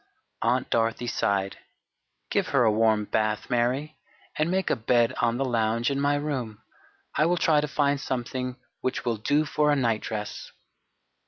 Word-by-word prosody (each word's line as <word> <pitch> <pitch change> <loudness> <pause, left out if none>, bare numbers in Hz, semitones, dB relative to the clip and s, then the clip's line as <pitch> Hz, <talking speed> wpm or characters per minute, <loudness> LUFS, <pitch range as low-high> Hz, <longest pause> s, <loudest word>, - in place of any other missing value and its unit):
Aunt 125 +2 +1
Dorothy 115 +1 +1
sighed, 100 -4 -1 0.7
"Give - - +1
her - - +3
a 110 - +4
warm 110 -1 +2
bath, 110 +2 -1
Mary, 125 +6 0 0.4
and 155 +2 0
make 190 0 0
a - - +3
bed 120 +2 +2
on 115 0 +1
the 135 - 0
lounge 115 0 +1
in 140 0 -1
my 145 0 +2
room. 130 -8 -3 0.5
I 155 - +3
will 175 +1 +2
try 155 -3 +3
to 150 - -2
find 140 -1 +1
something 125 0 -3 0.2
which 130 - -3
will 115 -2 0
do 145 +8 +1
for 150 0 +1
a - - +4
nightdress." 110 -4 -2
125 Hz, 165 wpm, -26 LUFS, 115-145 Hz, 0.7 s, a